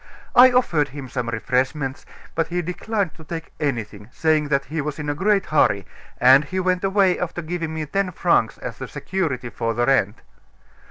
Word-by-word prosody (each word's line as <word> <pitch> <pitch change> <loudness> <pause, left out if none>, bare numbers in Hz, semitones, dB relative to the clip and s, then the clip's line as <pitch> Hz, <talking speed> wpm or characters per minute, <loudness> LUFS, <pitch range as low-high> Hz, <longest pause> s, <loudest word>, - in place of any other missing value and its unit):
I 255 +1 +8
offered 175 - +2
him 140 -1 -8
some 125 -1 -3
refreshments; 130 +4 -1 0.3
but 165 0 0
he 175 +1 -2
declined 195 +2 -2
to 160 - -14
take 165 +1 -7
anything, 110 -7 -3
saying 155 -1 +1
that 140 -1 0
he 155 +1 -3
was 150 0 -4
in 150 -1 -4
a - - -1
great 195 +5 +1
hurry; 100 - +2 0.3
and 130 +3 +7
he 185 +6 -4
went 185 0 0
away 195 -2 +3
after 175 -1 -3
giving 165 0 -3
me 155 -1 -3
ten 195 +4 -1
francs 170 -10 +1
as - - -7
security 150 -11 -3
for 115 +1 -2
the 120 +1 +1
rent." 120 -6 +1
155 Hz, 180 wpm, -22 LUFS, 130-180 Hz, 0.3 s, I